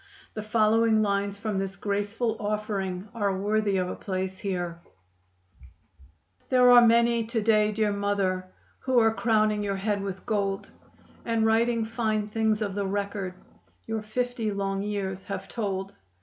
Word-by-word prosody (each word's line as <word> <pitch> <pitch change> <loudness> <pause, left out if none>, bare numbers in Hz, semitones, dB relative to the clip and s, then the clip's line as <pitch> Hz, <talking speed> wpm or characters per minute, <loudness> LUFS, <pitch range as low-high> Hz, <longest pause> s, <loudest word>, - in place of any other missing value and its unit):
The 215 - -4
following 220 +1 +3
lines 200 0 0
from 205 -1 -2
this 195 0 -3
graceful 205 +3 -1
offering 205 -3 -2
are 200 -4 0
worthy 205 0 +1
of 180 -1 0
a - - -3
place 190 -1 -4
here: 175 -4 -3 1.7
There 250 -1 +6
are 245 0 +9
many 235 0 +4
to 230 0 -1
day, 215 -1 +3
dear 210 -1 0
mother, 195 -2 -1 0.3
Who 260 -1 0
are 225 -1 +5
crowning 215 -2 +2
your 200 -1 -1
head 200 +1 -1
with 195 -1 -5
gold, 200 -3 -1 0.5
And 230 -1 +1
writing 230 +1 +2
fine 220 -2 -1
things 220 0 +1
of 200 -2 -3
the 200 0 -2
record 200 -2 -3 0.5
Your 225 -1 -3
fifty 235 +1 -2
long 195 -1 -2
years 195 -2 -3
have 195 - -5
told. 195 -3 -3
210 Hz, 150 wpm, -27 LUFS, 195-225 Hz, 1.7 s, are